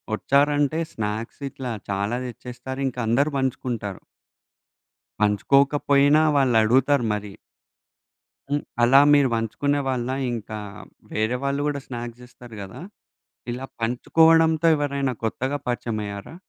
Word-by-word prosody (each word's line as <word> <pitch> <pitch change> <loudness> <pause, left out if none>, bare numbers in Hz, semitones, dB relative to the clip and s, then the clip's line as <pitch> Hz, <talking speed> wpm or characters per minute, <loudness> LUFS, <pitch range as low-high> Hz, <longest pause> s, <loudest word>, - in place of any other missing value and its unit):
వచ్చారంటే 145 +4 +2
స్నాక్స్ 110 +4 -4
ఇట్లా 130 -2 -6 0.2
చాలా 100 +3 -1
తెచ్చేస్తారు 125 +2 -7
ఇంకా 125 -1 -5
అందరు 140 +7 +2
పంచుకుంటారు. 120 -6 -3 1.2
పంచుకోకపోయినా 140 +7 +3
వాళ్ళు 130 -4 +3
అడుగుతారు 130 +3 +3
మరి. 105 -1 -6 1.2
హ్మ్. 145 +1 0 0.2
అలా 125 +3 +6
మీరు 145 -2 +5
పంచుకునే 140 +6 -1
వాళ్ళా? 130 0 -1 0.2
ఇంకా 110 -2 -5 0.5
వేరే 110 +3 0
వాళ్ళు 140 +1 0
కూడా 145 -1 -2
స్నాక్స్ 120 -1 -7
ఇస్తారు 120 -2 -13
కదా! 95 - -9 0.7
ఇలా 125 +2 -6 0.2
పంచుకోవడంతో 160 +7 +3
ఎవరైనా 140 -2 -1
కొత్తగా 130 +5 -1
పరిచయమైయ్యారా? 110 -2 -4
125 Hz, 105 wpm, -23 LUFS, 115-140 Hz, 1.2 s, అలా